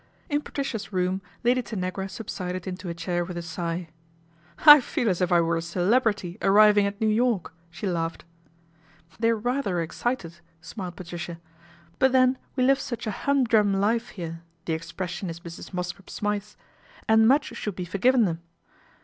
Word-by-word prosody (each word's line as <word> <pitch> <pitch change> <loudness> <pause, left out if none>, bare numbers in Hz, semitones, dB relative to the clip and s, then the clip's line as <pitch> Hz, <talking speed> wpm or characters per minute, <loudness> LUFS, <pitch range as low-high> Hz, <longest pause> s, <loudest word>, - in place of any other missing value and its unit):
In 290 -1 +1
Patricia's 225 -10 -4
room 185 0 0 0.2
Lady 250 +1 +3
Tanagra 190 -3 -4
subsided 185 -3 -5
into 185 -1 -5
a - - -2
chair 175 +1 -1
with 175 0 -6
a 170 - -4
sigh. 170 0 -4 0.4
" 165 - -20
I 295 - +2
feel 240 - -2
as 185 -1 0
if 180 - +1
I 175 -1 +5
were 165 0 +1
a - - -2
celebrity 195 +2 0
arriving 205 +1 +6
at 200 +1 -6
New 220 - +1
York," 220 -3 +1 0.2
she 175 +4 -7
laughed. 165 -3 -2 0.5
" 160 +1 -29
They're 230 0 +3
rather 240 -5 -1
excited," 170 0 -3 0.2
smiled 180 +1 -7
Patricia, 175 -1 -7 0.3
" 170 0 -27
but 265 0 +4
then 255 0 +4 0.2
we 255 - +1
live 270 +1 +4
such 235 -4 -5
a 215 - -1
humdrum 225 -6 +2
life 225 +4 +1
here 165 -5 -7 0.2
the 165 - -1
ex 160 +1 -5
pression 180 0 -4
is 165 +1 -7
Mrs. 170 0 -9
Mosscrop 180 +1 -5
Smythe's 210 0 -3 0.5
and 220 0 +5
much 270 -1 +2
should 210 -4 -4
be 180 - -4
forgiven 230 +7 +3
them. 165 -2 -2
190 Hz, 175 wpm, -26 LUFS, 170-225 Hz, 0.5 s, arriving